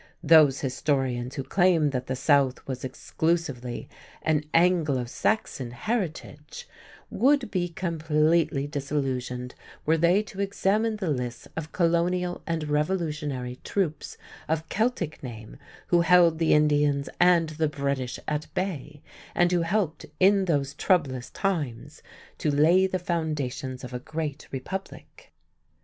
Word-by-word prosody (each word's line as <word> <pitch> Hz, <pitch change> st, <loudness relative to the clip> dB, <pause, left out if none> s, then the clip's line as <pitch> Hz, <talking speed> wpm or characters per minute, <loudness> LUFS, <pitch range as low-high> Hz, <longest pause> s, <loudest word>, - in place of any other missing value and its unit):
Those 155 Hz, -4 st, +6 dB
historians 130 Hz, -2 st, -1 dB
who 135 Hz, -, -3 dB
claim 175 Hz, -3 st, +3 dB
that 130 Hz, -1 st, -3 dB
the 130 Hz, -, -2 dB
South 135 Hz, -1 st, +2 dB
was 130 Hz, -2 st, -5 dB
exclusively 135 Hz, -2 st, -2 dB, 0.4 s
an 155 Hz, -2 st, +1 dB
"Anglo 165 Hz, -7 st, +3 dB
Saxon" 130 Hz, -, -1 dB
heritage 150 Hz, -, -4 dB, 0.4 s
would 270 Hz, -3 st, +2 dB
be 175 Hz, -2 st, -1 dB
completely 160 Hz, -3 st, +1 dB
disillusioned 135 Hz, -4 st, -3 dB, 0.3 s
were 160 Hz, +1 st, +2 dB
they 175 Hz, +5 st, +4 dB
to 195 Hz, -1 st, -7 dB
examine 205 Hz, +3 st, +1 dB
the 190 Hz, -7 st, -2 dB
lists 125 Hz, -3 st, -4 dB
of 160 Hz, -1 st, -5 dB
Colonial 175 Hz, +1 st, +1 dB
and 165 Hz, -2 st, -2 dB
Revolutionary 150 Hz, -5 st, -2 dB
troops 175 Hz, -6 st, -2 dB, 0.3 s
of 160 Hz, +1 st, -1 dB
Celtic 215 Hz, -8 st, -1 dB
name 110 Hz, -4 st, -9 dB, 0.3 s
who 175 Hz, -1 st, +4 dB
held 170 Hz, -1 st, +5 dB
the 165 Hz, -2 st, +4 dB
Indians 145 Hz, -2 st, +2 dB
and 175 Hz, -2 st, +5 dB
the 155 Hz, 0 st, -1 dB
British 140 Hz, -3 st, -2 dB
at 150 Hz, 0 st, -3 dB
bay, 150 Hz, -6 st, -4 dB, 0.3 s
and 175 Hz, 0 st, +3 dB
who 175 Hz, -1 st, +2 dB
helped 170 Hz, -1 st, -1 dB
in 195 Hz, +1 st, +5 dB
those 140 Hz, -5 st, 0 dB
"troublous 140 Hz, -8 st, 0 dB
times" 150 Hz, -, -3 dB, 0.4 s
to 155 Hz, -, 0 dB
lay 165 Hz, +6 st, +4 dB
the 185 Hz, -, -1 dB
foundations 150 Hz, -7 st, -3 dB
of 125 Hz, -, -8 dB
a 125 Hz, -, -3 dB
great 150 Hz, +1 st, -5 dB
Republic. 190 Hz, +9 st, -7 dB
155 Hz, 130 wpm, -26 LUFS, 135-175 Hz, 0.4 s, Those